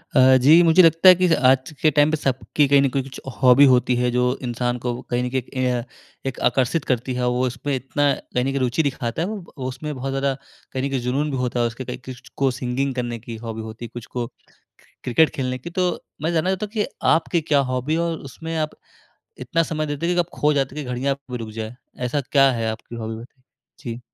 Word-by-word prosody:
अ, 130 0 +7
जी 155 +6 +7
मुझे 165 +2 +6
लगता 165 +3 +7
है 185 - +9
कि 180 +1 +2 0.2
आज 130 +2 +3
के 155 - +5
टाइम 145 +1 +5
पे 155 - +1
सबकी 135 +1 0
कहीं 140 0 +5
न 140 - +2
कुछ 135 0 -4 0.2
हॉबी 130 +2 +7
होती 125 0 +3
है, 125 0 +1
जो 125 +1 +1
इंसान 120 0 -1
को 120 - 0 0.2
कहीं 125 0 0
न 125 - -2
कहीं 130 +1 -1
एक 125 - -21
ये 130 -1 +1
अ, 120 -1 -1 0.4
एक 135 -2 -4
आकर्षित 135 +4 0
करती 125 0 -1
है, 125 0 -1
वो 125 +1 +1
उसपे 130 +3 -3
इतना 140 +3 0
कहीं 125 -1 -3
न - - -1
कहीं 140 - -1
रुचि 130 +5 +1
दिखाता 125 -1 -2
है 170 - 0
वो, 215 +1 -4 0.2
वो 130 -2 -4
उसमें 135 +4 -5
बहुत 130 +1 -4
ज़्यादा, 135 0 0 0.4
कहीं 130 -1 -3
न 140 - 0
कहीं 135 -1 -1
जुनून 135 +5 -1
भी 135 - -2
होता 125 -1 -1
है, 120 - +3
उसके 115 +3 -7
कई - - -5
किस्ट 130 -1 -10
को 135 -1 +2
सिंगिंग 130 +2 -2
करने 120 -2 -3
की 115 +1 -8
हॉबी 110 -1 -5
होती 110 +2 -8
है, - - -9
कुछ 120 -1 -7
को 120 -1 -4 0.8
क्रिकेट 150 +6 +4
खेलने 130 -1 -2
की, 130 +7 -8
तो 180 +1 +1 0.3
मैं 160 +2 0
जानना 165 +2 +1
चाहता 190 +2 -1
हूँ 205 - -13
कि 215 -2 0 0.3
आपकी 170 +1 +1
क्या 145 - +6
हॉबी 130 +4 -1
है? 165 - +1
और 170 -1 -1
उसमें 165 +4 -6
आप 155 -1 -2 0.6
इतना 165 - 0
समय 155 -1 -2
देते 145 +2 -3
हो 180 - +2
कि - - -1
आप 170 - -2
खो 150 +1 +4
जाते 135 -1 -1
हैं, 150 - -4
कि 125 - -6
घड़ियाँ 125 +3 -1
आपकी 135 -2 -7
रुक 110 - -9
जाए, 110 +2 -6 0.2
ऐसा 125 +4 -1
क्या 135 -1 +6
है 115 -2 -2
आपकी 115 +1 -8
हॉबी? 110 -1 -4
ब - - -11 0.5
जी। 120 -3 -6
130 Hz, 250 wpm, -22 LUFS, 125-150 Hz, 0.8 s, है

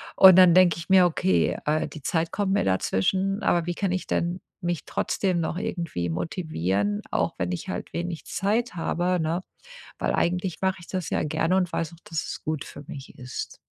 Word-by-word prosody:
Und 190 -1 +9
dann 180 -2 +8
denke 180 -2 +5
ich 170 - -7
mir: 185 -2 +7
„Okay, 95 - +2
äh, 155 +1 +1
die 155 - -10
Zeit 165 +3 0
kommt 200 -2 0
mir 205 - +2
dazwischen, 190 - 0
aber 170 -1 +2
wie 175 - -2
kann 195 -1 -1
ich 185 - -2
denn 175 +2 -1 0.2
mich 175 -2 -2
trotzdem 185 -3 0
noch 165 - -2
irgendwie 170 - -3
motivieren, 105 - -1
auch - - 0
wenn 90 +1 -1
ich 90 - -4
halt - - -5
wenig 170 -1 -4
Zeit 220 +3 -1
habe“, 175 +1 0
ne? 165 +3 -1 0.6
Weil - - 0
eigentlich 180 0 -1
mache 190 0 +1
ich 170 - -13
das 185 -4 -3
ja - - +1
gerne 165 +4 +1
und 180 -2 0
weiß 165 0 -2
auch, - - -14
dass 165 -2 -3
es - - -6
gut 155 -2 -3
für 145 - -10
mich 135 -1 -9
ist. 125 +1 -6
170 Hz, 200 wpm, -25 LUFS, 155-185 Hz, 0.6 s, Und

